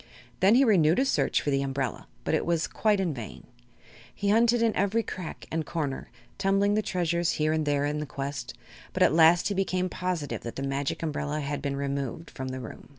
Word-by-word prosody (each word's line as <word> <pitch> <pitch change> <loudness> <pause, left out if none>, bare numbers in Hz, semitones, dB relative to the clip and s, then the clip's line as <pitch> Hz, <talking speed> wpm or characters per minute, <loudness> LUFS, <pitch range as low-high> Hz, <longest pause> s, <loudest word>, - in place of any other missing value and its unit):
Then 195 +4 +5
he 265 - +6
renewed 170 -7 +4
his 265 +1 +2
search - - +1
for 145 - 0
the 135 0 +2
umbrella, 135 -3 -3 0.2
but - - -1
it - - +2
was 170 -1 +1
quite 210 -2 +1
in 180 -5 0
vain. 120 -5 -8 0.7
He 200 - -1
hunted 230 +2 +4
in 225 -2 +2
every 200 +4 +1
crack 185 -6 -7
and 160 0 -1
corner, 150 -4 -3 0.3
tumbling 195 +1 +2
the 215 - +2
treasures 170 -4 0
here 155 0 +1
and 155 -1 -1
there 145 0 +2
in 150 +1 -1
the 150 - -4
quest, 135 -3 -5 0.4
but - - +3
at - - +4
last 165 +3 +5
he - - 0
became 185 -1 0
positive 180 -6 -3
that 115 - -7
the 135 - -4
Magic 140 +3 -2
Umbrella 150 -1 -2
had 145 0 -3
been 140 -1 -2
removed 140 +2 -3
from 130 -1 -6
the 130 0 -4
room. 120 - -10
160 Hz, 215 wpm, -27 LUFS, 140-190 Hz, 0.7 s, he